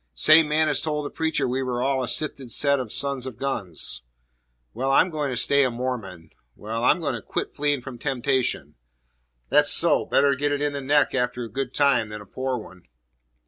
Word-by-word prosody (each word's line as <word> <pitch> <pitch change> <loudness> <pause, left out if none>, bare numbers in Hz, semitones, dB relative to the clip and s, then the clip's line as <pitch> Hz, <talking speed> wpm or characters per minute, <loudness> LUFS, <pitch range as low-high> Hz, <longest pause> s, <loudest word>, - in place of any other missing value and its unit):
"Same 155 - +6
man 155 +1 +2
as 145 -3 +2
told 150 -2 -3
the - - -6
preacher 160 -4 -1
we 130 +2 -2
were 125 -1 -2
all 135 0 0
a - - -4
sifted 135 -4 -2
set 140 +2 +3
of 125 -5 -5
sons 140 -2 0
of 125 - -8
guns." 100 - -2 0.7
"Well, 130 +3 -2
I'm 175 +6 +3
going 150 -3 -2
to 130 - -3
stay 140 +3 +3
a 130 - +1
Mormon." 115 -9 -6 0.2
"Well, 115 +2 -5
I'm 180 - +3
going 145 -5 -2
to 115 - -5
quit - - -5
fleeing 145 -3 0
from 130 -3 -9
temptation." 130 -1 -1 0.8
"That's - - +4
so! - - +4
Better 140 0 +3
get 145 +2 -1
it 145 - -1
in 145 0 -1
the 140 - -4
neck 145 +2 +2
after 125 -1 -1
a 115 - -8
good 135 -1 -4
time 135 -6 +2
than 105 0 -7
a 105 - -12
poor 130 +5 -3
one." 95 -5 -12
135 Hz, 210 wpm, -24 LUFS, 120-145 Hz, 0.8 s, Same